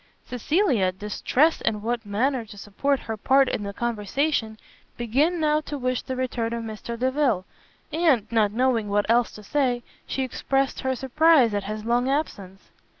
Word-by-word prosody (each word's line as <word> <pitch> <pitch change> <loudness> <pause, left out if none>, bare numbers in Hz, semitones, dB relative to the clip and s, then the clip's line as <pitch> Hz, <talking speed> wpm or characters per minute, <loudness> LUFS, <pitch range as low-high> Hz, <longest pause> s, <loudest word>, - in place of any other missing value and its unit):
Cecilia, 250 - +1
distressed 210 - +1
in 210 -2 -1
what 235 +1 -2
manner 245 +5 0
to 205 -1 -13
support 255 +8 -1
her 220 - -4
part 265 +5 +3
in - - -2
the 200 -1 -4
conversation, 225 +2 -1 0.4
began 280 +9 +1
now 305 -1 +2
to 295 -1 -6
wish 255 -1 -1
the 260 - -5
return 245 -3 -2
of 235 -1 -3
Mr 225 +1 -6
Delvile; 255 -6 +1 0.5
and, 310 -9 +3
not 215 -3 +3
knowing 235 -2 +1
what 205 0 +1
else 235 +1 +3
to 210 - -11
say, 250 0 0 0.2
she 270 - -2
expressed 270 +1 -1
her 260 -1 -1
surprise 270 -2 +4
at 205 -1 -2
his 215 +1 -5
long 240 +2 +1
absence. 200 -10 -4
240 Hz, 165 wpm, -24 LUFS, 215-275 Hz, 0.5 s, surprise